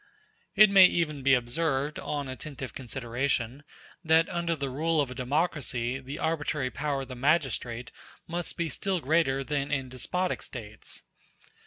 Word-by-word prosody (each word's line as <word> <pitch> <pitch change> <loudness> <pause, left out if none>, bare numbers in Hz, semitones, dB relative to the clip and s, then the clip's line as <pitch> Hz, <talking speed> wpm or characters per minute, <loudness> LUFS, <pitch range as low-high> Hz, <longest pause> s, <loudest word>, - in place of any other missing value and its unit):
It 215 0 +8
may 190 -2 +9
even 150 -6 -1
be 135 0 +5
observed, 140 +3 0
on 145 -2 -3
attentive 130 0 -7
consideration, 125 0 -2 0.4
that 160 0 +4
under 170 -1 0
the 140 -3 -3
rule 160 +4 +1
of 140 -3 +1
a - - -4
democracy 130 -2 -1
the 135 +2 -7
arbitrary 150 -4 -1
power 145 -2 -2
of - - -10
the 130 - -7
magistrate 125 -4 0 0.3
must 170 +1 -3
be 170 -2 0
still 185 +5 -1
greater 140 -2 +2
than 145 0 -2
in 135 -3 -1
despotic 180 +9 -1
States. 110 -4 -7
140 Hz, 150 wpm, -28 LUFS, 130-160 Hz, 0.4 s, may